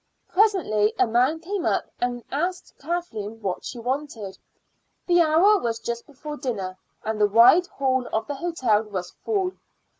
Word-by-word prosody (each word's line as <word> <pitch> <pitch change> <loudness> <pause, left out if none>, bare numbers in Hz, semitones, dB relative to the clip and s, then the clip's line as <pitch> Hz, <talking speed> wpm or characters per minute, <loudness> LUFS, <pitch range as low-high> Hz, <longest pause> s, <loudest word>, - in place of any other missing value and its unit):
Presently 355 - +2
a - - +4
man 250 +7 +2
came 370 +2 -3
up - - +1
and 245 -1 -2
asked 355 +6 -2
Kathleen 225 -10 -4
what 195 -4 -3
she 250 - -6
wanted. 240 -5 -4 0.7
The 350 -1 +4
hour 340 +6 +5
was 230 -5 -1
just 235 0 -5
before 295 +1 -8
dinner, 200 -10 -3 0.3
and 220 -1 -2
the 210 - +6
wide 240 - +6
hall 260 -5 0
of 220 0 -1
the 290 - -4
hotel 270 -9 +1
was 195 -5 -5
full. 390 -4 -1
260 Hz, 155 wpm, -24 LUFS, 220-340 Hz, 0.7 s, the